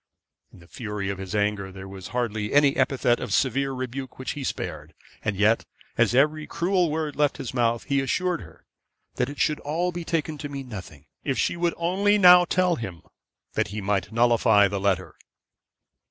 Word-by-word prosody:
In - - -16
the 85 - -17
fury 105 -2 -5
of 100 - -6
his 95 +1 -5
anger, 105 -2 0
there 95 0 -9
was 95 -1 -9
hardly 110 -4 -2
any 145 -1 +5
epithet 130 -2 +2
of - - -5
severe 135 +1 +1
rebuke 130 0 -5
which 130 - -4
he 145 - -5
spared, 80 - -5 0.3
and 105 - -1
yet, 110 +3 +3 0.3
as 115 0 +2
every 150 +3 +2
cruel 175 0 +1
word 155 -1 -2
left 145 -1 +1
his 125 - -6
mouth, 120 -2 +1
he 140 -1 +1
assured 180 +6 -1
her - - -15 0.5
that 125 - 0
it 145 - -8
should 150 - +1
all 170 +5 -1
be 175 0 -5
taken 155 -2 -2
to 145 - -5
mean 140 -2 -6
nothing, 90 - -9 0.2
if 135 -2 -1
she - - +1
would 170 0 0
only 195 +5 +2
now 180 -2 +8
tell 180 -1 +1
him 95 -7 -7 0.5
that - - 0
he 105 +3 -5
might 100 +1 -1
nullify 115 -3 +4
the 100 0 -3
letter. 95 -2 0
130 Hz, 190 wpm, -25 LUFS, 105-155 Hz, 0.5 s, now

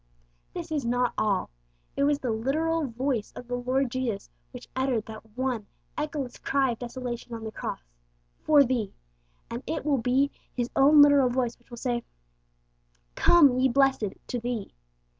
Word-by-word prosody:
This - - -6
is 295 -3 -1
not 245 +1 +1
all. 200 - 0 0.4
It 280 - +2
was 290 0 +3
the 255 -4 -2
literal 305 +7 0
voice 245 -2 -2
of 245 - -9
the 245 - -5
Lord 255 +1 0
Jesus 235 -6 -3 0.2
which 250 -1 -10
uttered 260 -4 0
that 220 0 -12
one 250 -5 -1 0.3
echoless 295 -4 -4
cry 270 -2 +1
of 230 - -6
desolation 245 -1 -5
on 225 - -7
the 220 - -5
Cross - - -5 0.6
'for 295 -2 +6
thee,' 240 -6 -2 0.6
and 235 +1 -4
it 320 - -3
will 285 -3 +2
be 260 +4 +2 0.2
His 245 -1 -2
own 290 +2 +8
literal 285 -3 +5
voice 245 -1 -1
which 240 - -29
will 240 - -9
say, 240 -1 -1 1.1
'Come, 280 - +5
ye 260 +1 +4
blessed!' 265 -6 +2
to 245 - -3
thee. 235 -3 -4
250 Hz, 165 wpm, -27 LUFS, 235-275 Hz, 1.1 s, own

